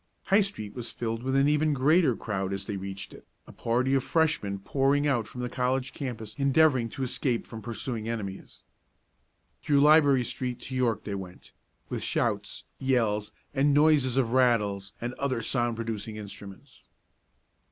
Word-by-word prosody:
High 200 Hz, +1 st, +4 dB
street 110 Hz, -, -4 dB
was 120 Hz, -2 st, -5 dB
filled 115 Hz, 0 st, -3 dB
with 130 Hz, +2 st, 0 dB
even 150 Hz, +2 st, +3 dB
a -, -, +2 dB
greater 145 Hz, 0 st, +3 dB
crowd 95 Hz, -3 st, -3 dB
as 100 Hz, 0 st, -4 dB
they 100 Hz, -, -4 dB
reached 95 Hz, +1 st, -6 dB
it, -, -, -14 dB, 0.2 s
a -, -, -12 dB
party 125 Hz, +3 st, 0 dB
of 135 Hz, -2 st, +2 dB
Freshman 155 Hz, -13 st, +1 dB
pouring 135 Hz, +8 st, +1 dB
out 120 Hz, -7 st, +1 dB
from 125 Hz, -, -7 dB
the 125 Hz, -, -2 dB
college 125 Hz, +1 st, -1 dB
campus 115 Hz, -6 st, -5 dB
endeavoring 140 Hz, -3 st, +3 dB
to 135 Hz, -, -5 dB
escape 125 Hz, -1 st, -1 dB
from 115 Hz, -1 st, -9 dB
pursuing 115 Hz, +1 st, -4 dB
enemies. 100 Hz, -4 st, -6 dB, 1.0 s
Through 145 Hz, -1 st, +3 dB
Library 145 Hz, -3 st, +6 dB
street 125 Hz, +1 st, -4 dB
to 130 Hz, -, -7 dB
York 120 Hz, -4 st, +1 dB
they 105 Hz, -, -4 dB
went, 95 Hz, -2 st, -8 dB, 0.4 s
with -, -, -3 dB
shouts, -, -, -1 dB, 0.2 s
yells 115 Hz, -6 st, +1 dB, 0.2 s
and 140 Hz, +1 st, +3 dB
noises 145 Hz, -4 st, +4 dB
of 120 Hz, -4 st, +2 dB
rattles 105 Hz, -6 st, +2 dB
and 120 Hz, +1 st, -4 dB
other 135 Hz, -3 st, 0 dB
sound 120 Hz, 0 st, 0 dB
producing 110 Hz, -1 st, -4 dB
instruments. 100 Hz, -2 st, -11 dB
125 Hz, 165 wpm, -28 LUFS, 110-135 Hz, 1.0 s, Library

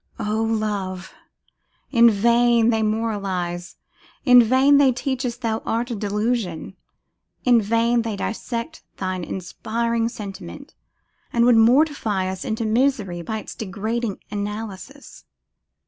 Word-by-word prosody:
O 215 Hz, +1 st, -1 dB
Love! 205 Hz, -4 st, -2 dB, 0.8 s
in 235 Hz, -2 st, +6 dB
vain 235 Hz, +2 st, +3 dB
they 225 Hz, -1 st, +1 dB
moralise; 200 Hz, -5 st, -2 dB, 0.5 s
in 250 Hz, -2 st, +8 dB
vain 260 Hz, +5 st, +4 dB
they 275 Hz, -2 st, +5 dB
teach 260 Hz, +1 st, -3 dB
us 240 Hz, -1 st, -5 dB
thou 225 Hz, -3 st, -2 dB
art 235 Hz, +2 st, -2 dB
a -, -, -2 dB
delusion; 205 Hz, -4 st, -2 dB, 0.7 s
in 240 Hz, -2 st, +5 dB
vain 230 Hz, +3 st, +2 dB
they 225 Hz, -2 st, -3 dB
dissect 230 Hz, +8 st, -4 dB, 0.2 s
thine 185 Hz, -1 st, -3 dB
inspiring 230 Hz, +6 st, -2 dB
sentiment, 200 Hz, -, -9 dB, 0.6 s
and 235 Hz, 0 st, +3 dB
would 245 Hz, -1 st, +6 dB
mortify 225 Hz, -5 st, +3 dB
us 190 Hz, 0 st, -4 dB
into 225 Hz, -2 st, -2 dB
misery 215 Hz, -6 st, 0 dB
by 220 Hz, +6 st, -4 dB
its 215 Hz, -, -8 dB
degrading 220 Hz, +1 st, -3 dB
analysis. 210 Hz, +6 st, -7 dB
225 Hz, 120 wpm, -22 LUFS, 200-235 Hz, 0.8 s, in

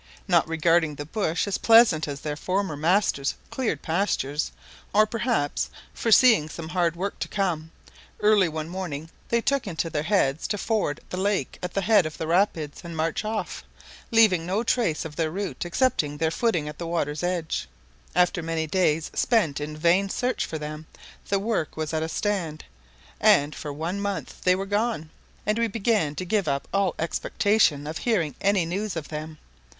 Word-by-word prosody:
Not -, -, +4 dB
regarding 165 Hz, -1 st, +2 dB
the 145 Hz, -, -6 dB
bush 165 Hz, -1 st, -1 dB
as 200 Hz, -, -1 dB
pleasant 225 Hz, -10 st, +6 dB
as 140 Hz, -1 st, -5 dB
their 150 Hz, -1 st, -3 dB
former 185 Hz, +1 st, -1 dB
master's 160 Hz, -3 st, +1 dB, 0.2 s
cleared 260 Hz, -4 st, -2 dB
pastures, 160 Hz, -, 0 dB, 0.4 s
or 215 Hz, +1 st, +6 dB
perhaps 225 Hz, -, -1 dB, 0.2 s
foreseeing 225 Hz, -8 st, +5 dB
some 160 Hz, 0 st, -7 dB
hard 175 Hz, -2 st, +1 dB
work 195 Hz, +3 st, -4 dB
to -, -, -2 dB
come, 170 Hz, -6 st, -1 dB, 0.5 s
early 210 Hz, -4 st, +4 dB
one 155 Hz, 0 st, -4 dB
morning 165 Hz, -4 st, -5 dB, 0.2 s
they 235 Hz, 0 st, +2 dB
took 275 Hz, -2 st, 0 dB
into 165 Hz, -2 st, -2 dB
their 150 Hz, -, 0 dB
heads 160 Hz, -4 st, +1 dB
to 205 Hz, -, -1 dB
ford 205 Hz, -9 st, -1 dB
the 180 Hz, -, -3 dB
lake 200 Hz, +1 st, -1 dB
at 180 Hz, -, -5 dB
the 195 Hz, -, +1 dB
head 205 Hz, -4 st, +4 dB
of 155 Hz, -, -8 dB
the 160 Hz, -, -3 dB
rapids, 165 Hz, -4 st, 0 dB
and 170 Hz, -2 st, -7 dB
march 160 Hz, +5 st, -1 dB
off, 215 Hz, 0 st, -3 dB, 0.5 s
leaving 215 Hz, -7 st, +5 dB
no 190 Hz, +6 st, -1 dB
trace 225 Hz, -11 st, +1 dB
of 155 Hz, -2 st, -7 dB
their 160 Hz, -1 st, +1 dB
route 190 Hz, 0 st, -4 dB
excepting 170 Hz, -, +1 dB
their 160 Hz, +1 st, +1 dB
footing 170 Hz, -5 st, 0 dB
at 150 Hz, -, -8 dB
the 170 Hz, -, -4 dB
water's 150 Hz, -3 st, -1 dB
edge. 175 Hz, -2 st, -2 dB, 0.5 s
After 180 Hz, 0 st, +3 dB
many 165 Hz, 0 st, -2 dB
days 160 Hz, -2 st, +1 dB
spent 180 Hz, -, +1 dB
in 150 Hz, +1 st, -5 dB
vain 175 Hz, +5 st, +3 dB
search 250 Hz, +5 st, -1 dB
for 160 Hz, -, -4 dB
them, 150 Hz, +1 st, -7 dB, 0.4 s
the 200 Hz, -, +3 dB
work 200 Hz, -7 st, -2 dB
was 155 Hz, 0 st, -3 dB
at 160 Hz, -, 0 dB
a 160 Hz, -, -2 dB
stand, 175 Hz, -6 st, -2 dB, 0.5 s
and 145 Hz, +1 st, +4 dB
for 150 Hz, -, -6 dB
one 165 Hz, +7 st, -3 dB
month 200 Hz, -1 st, -4 dB
they 180 Hz, 0 st, +5 dB
were 195 Hz, +1 st, -3 dB
gone, 205 Hz, -6 st, -1 dB, 0.3 s
and 215 Hz, +2 st, +1 dB
we 230 Hz, -, +2 dB
began 205 Hz, -8 st, 0 dB
to 185 Hz, -, -4 dB
give 195 Hz, -1 st, 0 dB
up 140 Hz, -1 st, -1 dB
all 195 Hz, -3 st, +1 dB
expectation 170 Hz, -2 st, +1 dB
of 155 Hz, +2 st, -4 dB
hearing 185 Hz, -, 0 dB
any 200 Hz, -3 st, +2 dB
news 195 Hz, +4 st, -3 dB
of 160 Hz, -3 st, -5 dB
them. 155 Hz, 0 st, -6 dB
175 Hz, 180 wpm, -25 LUFS, 155-205 Hz, 0.5 s, pleasant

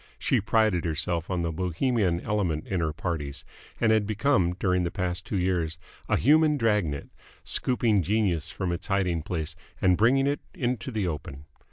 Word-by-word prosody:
She -, -, +1 dB
prided 110 Hz, -4 st, +2 dB
herself 85 Hz, +1 st, -1 dB
on 90 Hz, -2 st, -1 dB
the 85 Hz, -, -1 dB
Bohemian 90 Hz, -, 0 dB
element 90 Hz, -8 st, 0 dB
in 95 Hz, -, -2 dB
her 80 Hz, -2 st, 0 dB
parties, 75 Hz, -3 st, -4 dB, 0.3 s
and 110 Hz, -, +3 dB
had 110 Hz, -2 st, +3 dB
become 110 Hz, -5 st, +2 dB
during 90 Hz, 0 st, +1 dB
the 85 Hz, -, 0 dB
past 90 Hz, 0 st, -3 dB
two 100 Hz, -, -1 dB
years 90 Hz, -4 st, 0 dB, 0.3 s
a -, -, +3 dB
human 150 Hz, +2 st, +4 dB
drag 105 Hz, -6 st, +2 dB
net, 70 Hz, -1 st, -5 dB, 0.3 s
scooping 115 Hz, -5 st, +1 dB
Genius 95 Hz, -4 st, 0 dB
from 95 Hz, -3 st, -3 dB
its 85 Hz, -, -4 dB
hiding 95 Hz, -4 st, +1 dB
place 80 Hz, -1 st, -4 dB, 0.2 s
and 90 Hz, -1 st, +4 dB
bringing 130 Hz, +5 st, +4 dB
it 145 Hz, +1 st, 0 dB, 0.2 s
into 120 Hz, -3 st, -2 dB
the 110 Hz, -6 st, -1 dB
open. 75 Hz, -3 st, -6 dB
90 Hz, 175 wpm, -27 LUFS, 85-110 Hz, 0.3 s, human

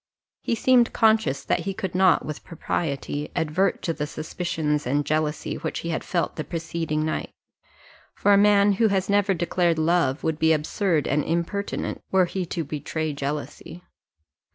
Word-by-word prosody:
He 230 Hz, -, -1 dB
seemed 245 Hz, 0 st, +4 dB
conscious 220 Hz, -12 st, +2 dB
that -, -, +1 dB
he 195 Hz, -1 st, -4 dB
could 190 Hz, -3 st, -4 dB
not, 185 Hz, -1 st, +4 dB
with 150 Hz, -, -6 dB
propriety, 150 Hz, -3 st, -3 dB
advert 170 Hz, +3 st, 0 dB
to 165 Hz, -, 0 dB
the 150 Hz, -1 st, -3 dB
suspicions 155 Hz, -2 st, -2 dB
and 145 Hz, +3 st, +1 dB
jealousy 155 Hz, 0 st, -1 dB
which 160 Hz, -, -4 dB
he 170 Hz, -, -4 dB
had 165 Hz, -, -2 dB
felt 175 Hz, -3 st, -2 dB
the 155 Hz, -, -2 dB
preceding 165 Hz, -2 st, -3 dB
night; 155 Hz, -, -2 dB, 0.9 s
for 205 Hz, -, +3 dB
a -, -, +7 dB
man 205 Hz, 0 st, +5 dB
who 220 Hz, +3 st, +3 dB
has 195 Hz, -1 st, 0 dB
never 200 Hz, -1 st, +3 dB
declared 175 Hz, 0 st, +1 dB
love 160 Hz, -3 st, +1 dB
would 160 Hz, -1 st, -1 dB
be 160 Hz, 0 st, +4 dB
absurd 155 Hz, +1 st, 0 dB
and 145 Hz, +1 st, +1 dB
impertinent, 170 Hz, +5 st, -2 dB
were 190 Hz, -1 st, +4 dB
he 180 Hz, 0 st, -4 dB
to 170 Hz, 0 st, -3 dB
betray 155 Hz, +1 st, -3 dB
jealousy. 145 Hz, +4 st, -5 dB
165 Hz, 165 wpm, -24 LUFS, 155-190 Hz, 0.9 s, a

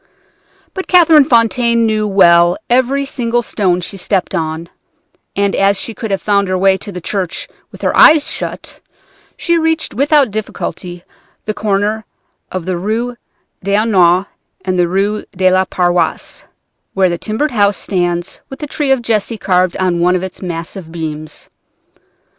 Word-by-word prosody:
But 380 Hz, -, -5 dB
Catherine 325 Hz, -5 st, +6 dB
Fontaine 235 Hz, -2 st, +2 dB
knew 215 Hz, -1 st, 0 dB
well 175 Hz, -3 st, +5 dB
every 260 Hz, +3 st, +2 dB
single 240 Hz, -3 st, -1 dB
stone 185 Hz, -5 st, 0 dB
she 195 Hz, +3 st, -6 dB
stepped 190 Hz, 0 st, -1 dB
on, 160 Hz, +1 st, -3 dB, 0.7 s
and, 200 Hz, 0 st, 0 dB
as 195 Hz, 0 st, +2 dB
she 230 Hz, -, -4 dB
could 220 Hz, 0 st, -6 dB
have 195 Hz, -3 st, -2 dB
found 200 Hz, -1 st, +2 dB
her 185 Hz, 0 st, 0 dB
way 190 Hz, +1 st, +3 dB
to 205 Hz, -, -8 dB
the 180 Hz, -, -6 dB
church 185 Hz, 0 st, -4 dB, 0.2 s
with -, -, -13 dB
her -, -, +1 dB
eyes 305 Hz, -1 st, +6 dB
shut, -, -, -6 dB, 0.6 s
she 340 Hz, -1 st, +1 dB
reached 320 Hz, 0 st, -1 dB
without 280 Hz, 0 st, +3 dB
difficulty 180 Hz, -4 st, -5 dB, 0.4 s
the 215 Hz, -, -2 dB
corner 210 Hz, +1 st, -1 dB, 0.5 s
of 185 Hz, -3 st, -4 dB
the 185 Hz, -1 st, -2 dB
Rue 220 Hz, +7 st, -2 dB
aux 210 Hz, -3 st, -4 dB
Nonnes 185 Hz, -3 st, +3 dB, 0.4 s
and 185 Hz, -1 st, -1 dB
the 175 Hz, -, +3 dB
Rue 200 Hz, +4 st, -1 dB
de 185 Hz, 0 st, +3 dB
la 185 Hz, 0 st, +3 dB
Paroisse, 175 Hz, -1 st, -1 dB, 0.5 s
where 190 Hz, -1 st, +3 dB
the 170 Hz, -, -3 dB
timbered 235 Hz, +8 st, -2 dB
house 205 Hz, -3 st, +2 dB
stands 175 Hz, -2 st, -2 dB
with 270 Hz, -, -8 dB
the 300 Hz, -, -5 dB
tree 290 Hz, -1 st, -2 dB
of 260 Hz, -3 st, +2 dB
Jesse 225 Hz, 0 st, -1 dB
carved 185 Hz, -2 st, +1 dB
on 180 Hz, -2 st, 0 dB
one 180 Hz, +1 st, +3 dB
of 185 Hz, -, -2 dB
its 190 Hz, -, -7 dB
massive 170 Hz, -1 st, -6 dB
beams. 155 Hz, -2 st, -7 dB
200 Hz, 160 wpm, -15 LUFS, 180-230 Hz, 0.7 s, Catherine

